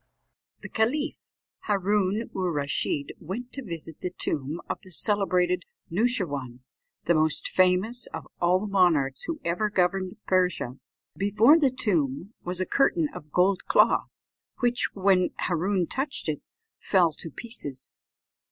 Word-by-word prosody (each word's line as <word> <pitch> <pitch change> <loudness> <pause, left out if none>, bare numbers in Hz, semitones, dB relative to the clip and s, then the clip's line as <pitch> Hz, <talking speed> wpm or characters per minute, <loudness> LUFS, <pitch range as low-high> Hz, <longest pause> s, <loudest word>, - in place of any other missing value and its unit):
The - - -7
caliph 290 +8 0 0.5
Hâroon 205 +2 +1
oor 185 -2 -1
Rasheed 145 -1 -1
went 235 +9 -6
to 275 - -6
visit 165 -5 -5
the 180 - -2
tomb 155 -2 -3
of - - -4
the 190 - -15
celebrated 180 -2 +3 0.3
Noosheerwân, 165 - -1 0.4
the 170 - +4
most 155 -1 +1
famous 190 +6 +2
of - - -8
all 175 +1 +4
the - - -3
monarchs 170 -9 +2
who 330 -2 -4
ever 180 +6 0
governed 185 0 0
Persia. 180 -9 0 0.4
Before 215 +10 +5
the 285 -4 +4
tomb 180 - -1
was 180 +1 -4
a 185 - 0
curtain 170 - +2
of 150 0 -10
gold 185 +3 +2
cloth, - - +3 0.5
which, 245 -1 +2
when 190 -2 +3
Hâroon 180 +1 0
touched 270 - -3
it, 150 -2 -2 0.4
fell 175 -5 +3
to 165 - -4
pieces. 145 - -5
185 Hz, 135 wpm, -26 LUFS, 165-210 Hz, 0.5 s, Before